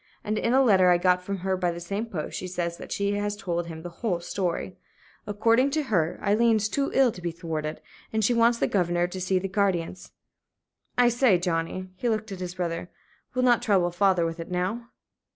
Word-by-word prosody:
And 215 +1 -1
in 230 - 0
a 265 +2 +5
letter 190 -6 +5
I 175 - +5
got 180 0 +2
from 195 +2 -4
her 190 -1 +1
by 180 -1 0
the 170 0 -4
same 200 +6 -4
post, 175 -9 -5
she 185 - -4
says 170 -1 -3
that - - -10
she 200 0 0
has 205 0 -1
told 175 -4 -3
him 160 -1 -8
the 175 - -7
whole 195 -7 0
story. 180 +1 -3 0.5
According 230 +6 +3
to 305 - +1
her, 175 - 0
Aileen's 215 +1 +3
too 275 +5 -1
ill 265 -3 +5
to 180 - -11
be 175 - -2
thwarted, 160 -2 -4 0.3
and 220 -1 +1
she 245 - +3
wants 235 0 +4
the - - +1
governor 175 -2 +1
to 185 +1 -6
see 185 +1 +1
the 190 +1 -1
guardians. 190 -3 -1 0.9
I 245 -1 +5
say, 240 -5 +4
Johnnie" 175 +2 -2
he 240 +6 -1
looked 215 -1 -2
at 190 - -6
his 180 -1 -5
brother 175 -1 -3 0.5
"we'll 255 0 +2
not 240 -2 +4
trouble 195 -7 +2
the - - -18
father 190 -3 +3
with 165 +1 -4
it 165 - -6
now?" 190 +7 -2
190 Hz, 220 wpm, -26 LUFS, 175-220 Hz, 0.9 s, a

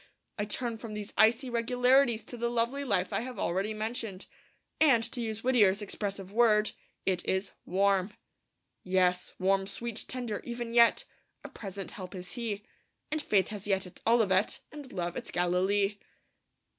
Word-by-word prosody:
I 205 - 0
turn 230 +2 -3
from 220 -2 -7
these 210 -1 -6
icy 230 +4 +4
regularities 245 0 +3
to - - -10
the 235 0 -1
lovely 240 +4 0
life 195 -8 0
I - - +1
have 250 +1 -6
already 190 +5 0
mentioned. 215 -2 -4 0.5
And, 270 -8 +5
to 245 - -4
use 220 -1 -4
Whittier's 215 -6 +4
expressive 200 -2 -4
word, 215 -2 +4 0.3
it 185 -2 0
is 190 +1 -1 0.2
'warm.' 195 +1 +2 0.7
Yes, 180 -1 +1
warm, 195 +1 +2
sweet, 230 +2 -4
tender, 245 -5 -4
even 235 -1 -5
yet 235 -1 +5 0.4
A - - -8
present 195 -2 -6
help 185 -4 -8
is 180 -1 -7
He; 215 -4 -4 0.5
And 310 0 0
faith 200 -9 +2
has 210 -2 -6
yet 190 -2 +1
its 180 - -12
Olivet, 215 -4 +3
And 290 -3 -9
love 175 -2 -3
its - - -5
Galilee. 195 +3 +1
210 Hz, 155 wpm, -30 LUFS, 195-235 Hz, 0.7 s, And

